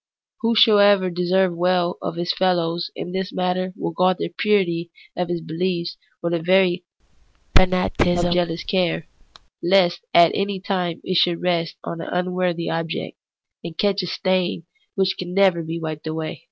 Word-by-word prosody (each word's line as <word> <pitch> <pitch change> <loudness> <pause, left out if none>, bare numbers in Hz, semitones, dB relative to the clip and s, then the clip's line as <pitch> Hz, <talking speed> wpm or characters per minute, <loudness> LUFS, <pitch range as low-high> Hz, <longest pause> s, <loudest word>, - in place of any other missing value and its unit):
Whoso 225 -2 +5
would 200 -3 +4
deserve 180 +1 +2
weU 175 0 +1
of - - -4
his 175 +1 -1
feUows 175 -2 0
in 180 - -6
this 190 0 -3
matter 185 0 -1
will - - -3
guard 185 +2 +2
the - - -3
purity 175 -5 +1 0.3
of 180 -1 -2
his 175 -1 -2
belief 170 +2 -2 0.3
with 170 0 -1
a 170 - 0
very 180 +1 +3 0.7
fanaticism 180 -1 +2
of - - +2
jealous 170 -1 -1
care, 180 -4 0 0.5
lest 175 -1 +3
at 170 -1 +6
any 200 -1 -1
time 180 -3 -2
it 185 - 0
should 175 0 +2
rest 170 -2 0
on 165 0 -5
an - - -6
unworthy 180 -1 -1
object, 165 0 -3 0.5
and 170 -1 -8
catch 200 -1 +1
a 180 - -4
stain 185 -1 -1 0.3
which 190 -1 +1
can 180 0 -5
never 190 -4 +4
be 165 +1 -5
wiped 155 -1 -5
away. 155 0 -4
180 Hz, 165 wpm, -22 LUFS, 170-185 Hz, 0.7 s, at